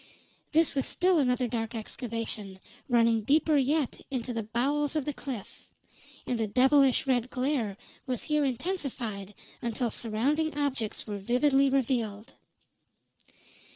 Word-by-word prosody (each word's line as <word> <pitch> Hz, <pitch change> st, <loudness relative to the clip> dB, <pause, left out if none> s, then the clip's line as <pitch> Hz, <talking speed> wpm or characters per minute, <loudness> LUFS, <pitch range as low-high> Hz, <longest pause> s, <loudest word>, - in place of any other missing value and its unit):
This 325 Hz, 0 st, +3 dB
was 270 Hz, -, +1 dB
still 360 Hz, -2 st, +3 dB
another 250 Hz, -2 st, +2 dB
dark 230 Hz, -1 st, -3 dB
excavation, 220 Hz, -3 st, -4 dB, 0.3 s
running 230 Hz, -2 st, +4 dB
deeper 300 Hz, +7 st, +3 dB
yet 280 Hz, 0 st, +1 dB
into 250 Hz, -2 st, -3 dB
the 230 Hz, -, -2 dB
bowels 275 Hz, +7 st, 0 dB
of 300 Hz, -4 st, 0 dB
the 295 Hz, -, -2 dB
cliff; 260 Hz, -7 st, -8 dB, 0.6 s
and 245 Hz, -2 st, -1 dB
the 220 Hz, -, 0 dB
devilish 265 Hz, +4 st, +4 dB
red 255 Hz, -2 st, +1 dB
glare 255 Hz, -6 st, -1 dB, 0.3 s
was 250 Hz, -3 st, -2 dB
here 300 Hz, -1 st, +1 dB
intensified 245 Hz, -, -3 dB, 0.3 s
until 235 Hz, 0 st, -1 dB
surrounding 280 Hz, +9 st, 0 dB
objects 270 Hz, -7 st, -1 dB
were 205 Hz, -2 st, -5 dB
vividly 270 Hz, +6 st, +3 dB
revealed. 230 Hz, -5 st, -1 dB
250 Hz, 125 wpm, -29 LUFS, 225-285 Hz, 0.6 s, running